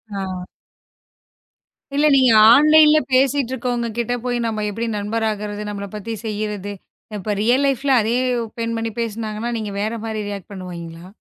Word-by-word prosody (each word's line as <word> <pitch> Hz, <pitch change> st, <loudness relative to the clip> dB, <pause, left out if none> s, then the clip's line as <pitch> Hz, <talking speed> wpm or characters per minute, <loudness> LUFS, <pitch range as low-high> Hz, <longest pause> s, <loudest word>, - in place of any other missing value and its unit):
ஆ. 195 Hz, -, -3 dB, 1.7 s
இல்ல. 295 Hz, +2 st, +3 dB
நீங்க 260 Hz, -3 st, +5 dB, 0.2 s
ஆன்லைன்ல 305 Hz, +2 st, +6 dB
பேசிட்டு 265 Hz, 0 st, +2 dB
இருக்கவங்க 240 Hz, -2 st, -2 dB
கிட்ட 240 Hz, 0 st, -1 dB
போய் 245 Hz, -1 st, 0 dB
நாம 215 Hz, -2 st, -2 dB
எப்படி 230 Hz, +3 st, -3 dB
நண்பர் 220 Hz, +2 st, -2 dB
ஆகுறது? 210 Hz, 0 st, -5 dB
நம்மள 200 Hz, -1 st, -5 dB
பத்தி 210 Hz, +2 st, -5 dB
செய்யறது. 210 Hz, -2 st, -4 dB, 0.5 s
இப்ப 205 Hz, +2 st, -2 dB
ரியல் 245 Hz, +5 st, +3 dB
லைஃப்ல 275 Hz, +1 st, 0 dB
அதே 225 Hz, +3 st, 0 dB, 0.4 s
பெண்மணி 230 Hz, -1 st, -2 dB
பேசுனாங்கன்னா, 225 Hz, 0 st, -3 dB
நீங்க 210 Hz, -2 st, -4 dB
வேற 215 Hz, +2 st, -1 dB
மாதிரி 220 Hz, -1 st, -3 dB
ரியேக்ட் 200 Hz, -1 st, -7 dB
பண்ணுவீங்களா? 175 Hz, -3 st, -8 dB
225 Hz, 140 wpm, -20 LUFS, 205-245 Hz, 1.7 s, ஆன்லைன்ல